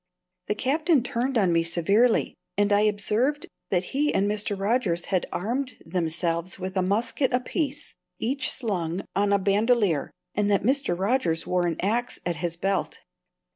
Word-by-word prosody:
The 210 - 0
Captain 300 +3 +2
turned 245 +2 -1
on 190 -5 +3
me 165 - +3
severely, 200 +8 +2 0.2
and 205 0 +3
I 205 - +4
observed 215 +7 +1 0.2
that 180 -2 +1
he 295 +2 +2
and 200 - +1
Mr. 205 0 -1
Rogers 195 -5 0
had 185 - +1
armed 250 +7 -3
themselves 170 +1 -1
with 190 0 -5
a 190 - +2
musket 220 +8 0
apiece, 275 +3 -2 0.2
each 265 +3 0
slung 185 -6 -1
on 200 +1 +2
a 200 - +5
bandolier, 200 - +2 0.2
and 205 0 +1
that 200 -2 +2
Mr. 260 -6 +1
Rogers 190 -5 0
wore 180 -1 +1
an 165 - -2
axe 235 +5 0
at 170 -1 -1
his 170 0 -3
belt. 195 +2 -1
205 Hz, 160 wpm, -25 LUFS, 180-245 Hz, 0.2 s, a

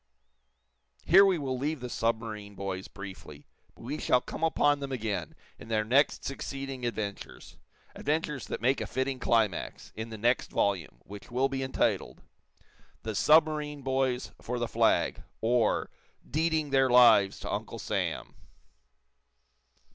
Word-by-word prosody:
Here 190 +4 +8
we 190 -3 +3
will 130 -4 -3
leave 150 +2 -2
the 125 - -5
submarine 110 -3 -3
boys 95 -1 -4
briefly, 95 -7 -10 0.3
but - - -15
we 140 +6 -4
shall 125 - +3
come 160 - -7
upon 145 -3 +3
them 140 -1 -5
again 110 -5 -3 0.2
in - - -11
their 110 -1 +1
next 135 +6 +2
succeeding 135 -2 -4
adventures 105 -4 -6 0.3
adventures 150 -3 -2
that - - -4
make 130 +3 +2
a - - -3
fitting 130 0 -2
climax, 110 -7 0
in 110 +1 -5
the 110 - -7
next 120 +4 +1
volume, 90 -11 -1
which 100 0 -11
will 130 +3 +1
be 135 -1 -3
entitled: 130 0 -1 0.8
"The 110 - -3
Submarine 150 +2 +3
Boys 130 -1 0
for 125 +1 -3
the 120 -1 -1
Flag; - - +2 0.2
Or, 115 -1 +1 0.4
Deeding 155 0 0
Their 135 -1 +4
Lives 120 -6 +6
to - - -4
Uncle - - -4
Sam." - - -3
125 Hz, 140 wpm, -29 LUFS, 110-140 Hz, 0.8 s, Here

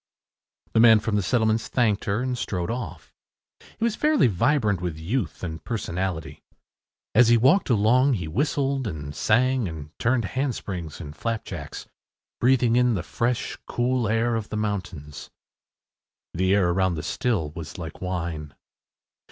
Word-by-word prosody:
” - - -43
The - - +3
man 115 -1 +8
from 105 0 -2
the 105 - +2
settlements 110 +2 +1
thanked 110 -5 +1
her 100 +4 0
and 130 -1 -1
strode 90 -5 -2
off. 100 -10 -6 0.6
He 225 - -4
was 230 -2 +1
fairly 305 +3 +3
vibrant 105 - +2
with 85 -4 -3
youth 95 +5 -3
and 80 -3 -5
personality. 90 -9 -3 0.7
As 120 +1 +6
he 120 0 +6
walked 135 - +4
along 125 +5 +4
he 90 -8 -2
whistled 135 - 0
and 75 -5 -6
sang 125 +1 +2
and 75 -3 -7
turned 120 -1 +1
handsprings 100 - -3
and 75 0 -8
flapjacks, 95 -10 -5 0.5
breathing 125 -2 +3
in 125 -1 +3
the 90 - -2
fresh, 120 +4 -2
cool 125 -1 0
air 115 +2 +1
of 110 -2 -3
the 110 - -3
mountains. 90 -9 -4 1.0
The 95 +3 +2
air 95 -3 +3
around 95 -1 +1
the 75 - -5
still 95 -11 -1
was 80 -1 -8
like 80 -3 -8
wine. 85 -5 -4
105 Hz, 150 wpm, -25 LUFS, 85-125 Hz, 1.0 s, man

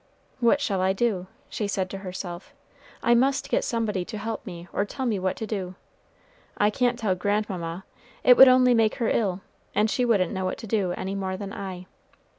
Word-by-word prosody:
"What 240 +4 +4
shall 200 -9 -1
I 190 +1 +2
do?" 195 -4 -1 0.2
she 210 - -3
said 190 -2 -1
to 195 - -5
herself. 185 +6 -7 0.5
"I 235 - +4
must 265 +3 +2
get - - +2
somebody 220 -6 -1
to 215 - -6
help 220 +1 -4
me 175 -2 -8
or - - +1
tell 260 +6 -5
me 220 -5 0
what 185 0 -1
to 220 - -5
do. 190 -4 -4 0.8
I 210 0 +3
can't 245 +1 +1
tell 210 -5 0
grandmamma; 185 -2 -2 0.4
it 250 - +8
would 265 - +10
only 255 -1 +6
make 225 -2 +3
her 230 - 0
ill, 195 -4 0 0.3
and 215 +1 +2
she 250 - +1
wouldn't 205 -8 +2
know 190 0 -2
what 185 - -2
to 225 - -8
do 200 -4 0
any 190 +2 -4
more 190 -1 -3
than 200 0 -6
I. 185 -2 -6
205 Hz, 205 wpm, -25 LUFS, 185-230 Hz, 0.8 s, would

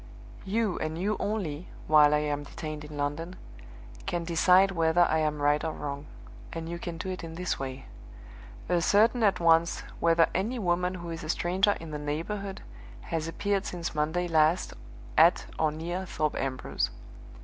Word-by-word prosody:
"You 210 -1 0
and 155 +1 -3
you 205 +5 0
only 185 -7 -3 0.2
(while 150 -1 +6
I 150 - +2
am 145 -1 -1
detained 150 +1 -7
in 150 0 -9
London) 145 +5 -3 0.7
can 175 -1 -1
decide 180 +3 +4
whether 165 -1 +2
I 160 -2 +3
am 150 -1 0
right 145 +1 +3
or 160 - -2
wrong 145 0 -5 0.4
and 165 -1 -5
you 170 +1 -5
can 170 -2 -5
do 190 - -5
it 185 -2 -5
in 165 -1 -7
this 180 +1 -2
way. 135 0 -5 0.8
Ascertain 205 +8 +3
at 205 -3 +3
once 165 0 +3 0.2
whether 165 0 +5
any 225 +7 -1
woman 180 -2 0
who 170 -2 -6
is 165 -1 -6
a 155 - -7
stranger 190 +5 +2
in 165 -1 -8
the 150 - -4
neighborhood 190 +7 -4 0.5
has 160 -1 -1
appeared 200 +3 -1
since 170 -2 -4
Monday 160 +4 0
last 160 +2 +2 0.5
at 170 +3 +5
or 155 -1 +2
near 175 +4 -4
Thorpe 155 -2 -1
Ambrose. 130 -1 -2
165 Hz, 170 wpm, -28 LUFS, 155-180 Hz, 0.8 s, while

